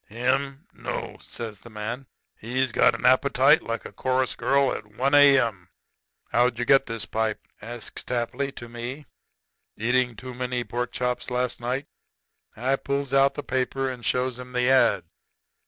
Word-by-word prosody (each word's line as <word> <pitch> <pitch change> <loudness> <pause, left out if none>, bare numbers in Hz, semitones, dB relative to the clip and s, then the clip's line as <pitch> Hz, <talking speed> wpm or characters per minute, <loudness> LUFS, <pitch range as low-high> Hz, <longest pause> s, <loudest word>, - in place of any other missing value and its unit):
"'Him? 135 +5 -1
No,' - - -5
says 110 -3 -7
the 120 - -13
man. 115 +5 -5 0.3
'He's 125 +3 -1
got - - +4
an - - -5
appetite 135 +3 +5
like 115 0 -4
a - - -7
chorus 130 0 0
girl 140 -1 +2
at 105 - -6
1 135 +5 +1
A.M.' 130 -10 +5 0.6
"'How'd 120 0 +3
you 120 - -1
get 135 +2 +5
this 115 -5 -3
pipe?' 110 +1 -2
says 115 +1 -7
Tapley 125 +3 -2
to 120 - -9
me. 120 +5 -6 0.7
'Eating 125 +2 +1
too 130 +3 -8
many 125 0 -2
pork 120 0 -3
chops 125 +1 -2
last 125 0 -1
night?' 125 +4 -2 0.7
"I 130 +4 +1
pulls 140 -1 -3
out 135 0 +4
the 145 - -4
paper 130 0 -1
and 125 -2 -9
shows 125 0 0
him 125 0 -9
the 125 +1 +3
ad. 100 -8 +4
125 Hz, 160 wpm, -25 LUFS, 120-135 Hz, 0.7 s, appetite